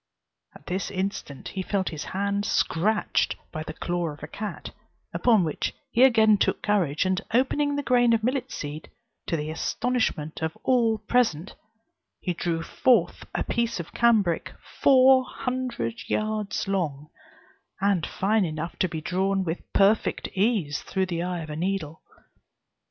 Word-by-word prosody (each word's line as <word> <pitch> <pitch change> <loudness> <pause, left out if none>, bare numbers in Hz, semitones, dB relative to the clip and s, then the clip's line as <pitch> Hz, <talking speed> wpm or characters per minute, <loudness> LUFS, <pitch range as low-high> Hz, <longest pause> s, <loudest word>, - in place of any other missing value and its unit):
At - - -15
this 185 +2 -2
instant 185 -7 -4
he 190 - -4
felt 190 0 -1
his 155 -2 -6
hand 200 +1 -1
scratched 205 +1 +1 0.2
by 155 - -5
the 155 0 -7
claw 175 -1 -2
of 145 -1 -10
a - - -5
cat: 210 0 -6 0.4
upon 225 -6 +4
which 155 -3 -2 0.2
he 240 - +2
again 220 -5 +6
took - - +1
courage, 185 -7 +1
and 185 0 +1
opening 285 +3 +2
the 285 - -2
grain 245 -3 +4
of 225 -1 +2
millet 255 +2 -1
seed, 150 +1 -6 0.4
to 165 - 0
the 150 +1 -3
astonishment 180 -5 -1
of 160 0 -2
all 235 -4 +3
present, 210 -6 0 0.7
he 180 - -2
drew 165 -1 -2
forth 255 +7 +2
a - - 0
piece 235 -3 -1
of 170 - -7
cambric 215 -8 +2 0.3
four 260 -1 +6
hundred 250 - -4
yards 215 -2 -1
long, 155 -7 -2 0.7
and 195 -4 +2
fine 210 +2 +1
enough 160 0 -4
to 185 - +2
be 160 -1 -4
drawn 190 +3 0
with 165 -1 -5
perfect 200 +2 +2
ease 190 - +1
through 190 -1 -1
the 170 -2 -3
eye 180 -1 -2
of 155 - -9
the 150 - -4
needle. 170 -2 -3
195 Hz, 155 wpm, -26 LUFS, 165-225 Hz, 0.7 s, again